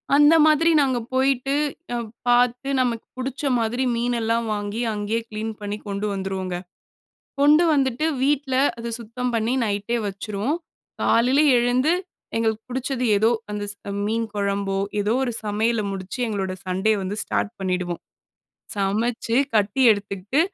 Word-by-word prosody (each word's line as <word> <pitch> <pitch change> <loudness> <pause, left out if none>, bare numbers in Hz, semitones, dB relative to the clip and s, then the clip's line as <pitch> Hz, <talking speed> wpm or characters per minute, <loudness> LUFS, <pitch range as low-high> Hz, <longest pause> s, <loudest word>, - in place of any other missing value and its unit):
அந்த 295 +2 +7
மாதிரி 310 +2 +4
நாங்க 260 -3 +1
போயிட்டு, 270 +1 +2 0.4
அ, - - 0 0.3
பாத்து, 245 +2 +3
நமக்கு 235 -3 -1
புடுச்ச 260 +2 -4 0.2
மாதிரி 230 +3 0
மீனெல்லாம் 235 -1 0
வாங்கி, 205 +2 -3
அங்கேயே 210 +2 -1
கிளீன் 220 +1 -4
பண்ணி 205 0 -3
கொண்டு 200 +1 -2
வந்துருவோங்க. 190 -2 -3 0.9
கொண்டு 300 +4 +6
வந்துட்டு, 270 0 +1 0.2
வீட்ல 275 -1 +1 0.2
அத 235 0 -5
சுத்தம் 245 +2 -4
பண்ணி, 230 +2 +1
நைட்டே 210 +3 -1
வச்சுருவோம். 205 - -2 0.4
காலையில 250 +4 +3 0.2
எழுந்து, 250 +6 +2 0.4
எங்களுக்கு 220 -1 0
பிடுச்சது 255 0 -2
எதோ, 220 +3 +3 0.2
அந்த 210 0 -3
ஸ், 205 - -10 0.3
மீன் 225 +2 -1
கொழம்போ, 200 -1 -1 0.2
எதோ 210 +2 +1
ஒரு 250 - -1
சமையல 215 +2 +1
முடுச்சு, 195 +5 -6
எங்களோட 195 -3 -2
சண்டே 190 +4 +1
வந்து 190 +2 -3
ஸ்டார்ட் 210 - -1
பண்ணிடுவோம். 180 -2 -2 0.8
சமச்சு 225 +4 0 0.2
கட்டி 210 +4 +2
எடுத்துக்கிட்டு, 205 +5 -2
225 Hz, 130 wpm, -23 LUFS, 205-250 Hz, 0.9 s, அந்த